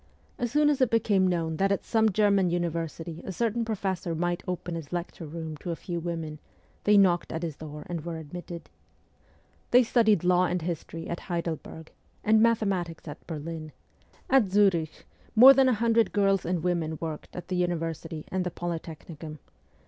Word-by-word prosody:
As 240 -2 -1
soon 295 +1 +4
as 275 - -1
it 255 - +4
became 205 -5 +3
known 165 -3 -1
that 195 +2 +2
at 200 - -1
some 220 -1 +3
German 200 -2 +3
university 170 -1 -3
a - - -5
certain 230 +3 0
professor 190 -6 -2
might 175 +1 -1
open 180 -1 -3
his 165 -4 -6
lecture 175 -1 -5
room 160 0 -6
to 175 - -7
a 170 - -1
few 170 +1 -5
women, 165 -3 -4 0.5
they 210 0 +6
knocked 180 -3 +3
at 165 +1 -4
his 160 -4 -3
door 150 -1 -8
and 170 -3 -5
were 170 -1 -4
admitted. 170 +2 -8 1.0
They 250 +1 +6
studied 220 -4 +3
law 180 0 +4
and 180 -2 -1
history 165 -1 -5
at 170 - -4
Heidelberg, 165 -2 -5 0.3
and 220 +1 +4
mathematics 195 -8 +1
at 145 - -9
Berlin; 155 -1 -6 0.5
at 260 -7 +4
Zurich 185 -6 +2 0.3
more 255 +5 +10
than 265 -1 +4
a - - +3
hundred 230 0 +2
girls 195 -2 +2
and 175 -2 -1
women 170 -3 -1
worked 160 -2 -6
at 180 0 -7
the 185 - -1
University 165 -2 -2
and 185 -1 0
the 180 - -2
Polytechnicum. 165 -2 -6
175 Hz, 175 wpm, -27 LUFS, 165-200 Hz, 1.0 s, more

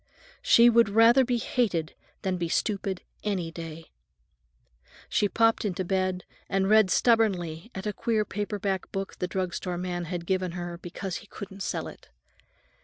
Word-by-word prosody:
She 235 +1 +6
would 235 -2 +5
rather 230 +5 +6
be 245 -1 0
hated 200 -10 -1 0.3
than 185 -1 0
be 170 -1 -2
stupid, 195 -1 -1 0.2
any 185 -6 -2
day. 165 -1 -9 1.2
She 205 - +2
popped 225 +2 +3
into 190 -3 -2
bed 185 0 0 0.3
and 195 0 +1
read 215 -2 +5
stubbornly 190 -7 +2
at 190 +2 -5
a 210 - -1
queer 220 0 0
paper 205 0 -3
book 195 0 -3
the 180 - -1
drug 185 -1 -2
store 180 -2 -3
man 175 -1 -3
had 170 0 -4
given 185 -1 -1
her 175 -1 -5
because 180 +1 -5
he 220 - -13
couldn't 195 -1 -9
sell - - -2
it. - - -13
190 Hz, 160 wpm, -27 LUFS, 175-215 Hz, 1.2 s, She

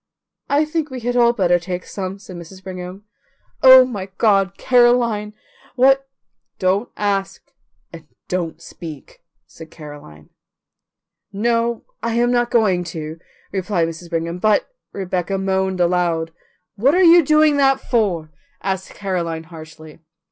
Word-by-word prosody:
"I 290 +2 +3
think 310 0 -3
we 260 -2 -7
had 245 +1 -2
all 235 -1 +5
better 180 -6 +2
take 180 +1 -5
some," 190 -1 -5
said 195 -2 -12
Mrs. 175 +2 -11
Brigham. 185 +1 -8 0.6
"Oh, 260 0 +9
my 205 -7 -5
God, 195 -3 +2
Caroline, 240 -4 +2 0.4
what 270 +1 +3 0.2
" - - -56
"Don't 195 +5 +1
ask 200 -2 -2 0.4
and 165 -2 -11 0.2
don't 175 -3 -3
speak," 155 -5 -11 0.2
said 160 -1 -13
Caroline. 145 - -13 1.0
"No, 230 +2 0 0.2
I 230 0 -2
am 240 +1 +2
not 240 -1 +1
going 200 -7 +2
to," 160 -1 -7 0.3
replied 185 -3 -1
Mrs. 165 +1 -10
Brigham; 170 +1 -3
"but 215 +1 +2
" - - -64
Rebecca 190 0 -3
moaned 190 -1 -1
aloud. 170 -2 0 0.4
"What 265 - +3
are 375 - +4
you 340 0 +7
doing 305 0 +4
that 270 -1 +3
for?" 180 -10 -1 0.3
asked 190 -1 -3
Caroline 170 -5 -3
harshly. 155 -1 -12
195 Hz, 140 wpm, -20 LUFS, 175-240 Hz, 1.0 s, Oh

